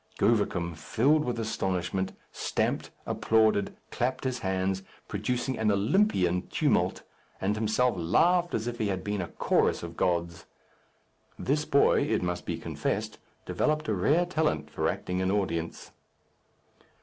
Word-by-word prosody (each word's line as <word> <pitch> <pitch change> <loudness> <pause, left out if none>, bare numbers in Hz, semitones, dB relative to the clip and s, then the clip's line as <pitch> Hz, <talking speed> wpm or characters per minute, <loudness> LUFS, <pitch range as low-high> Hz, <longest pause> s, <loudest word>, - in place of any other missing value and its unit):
Govicum, 100 -6 +1
filled 140 - +2
with 120 -1 -2
astonishment, 95 -3 -1 0.2
stamped, - - -1 0.2
applauded, 110 -3 +2
clapped 130 +2 -1
his 130 -2 -1
hands, 95 0 -1 0.3
producing 120 +5 -2
an 110 -1 +2
Olympian 100 - +2
tumult, - - +1 0.4
and 100 +2 +1
himself 110 +3 +2
laughed 175 - +3
as 110 - -2
if 120 0 -4
he 110 - +1
had 95 -2 -2
been 105 -1 -2
a 90 - -3
chorus - - +1
of 85 -1 -7
gods. 85 -1 -1 0.9
This 150 +3 0
boy, 140 -2 +4
it - - 0
must 90 0 -3
be - - -2
confessed, - - -3 0.3
developed 155 0 0
a - - +2
rare 145 - +3
talent 155 - -1
for - - 0
acting 90 +1 -2
an 95 - +1
audience. 85 -5 -2
105 Hz, 135 wpm, -28 LUFS, 90-125 Hz, 0.9 s, boy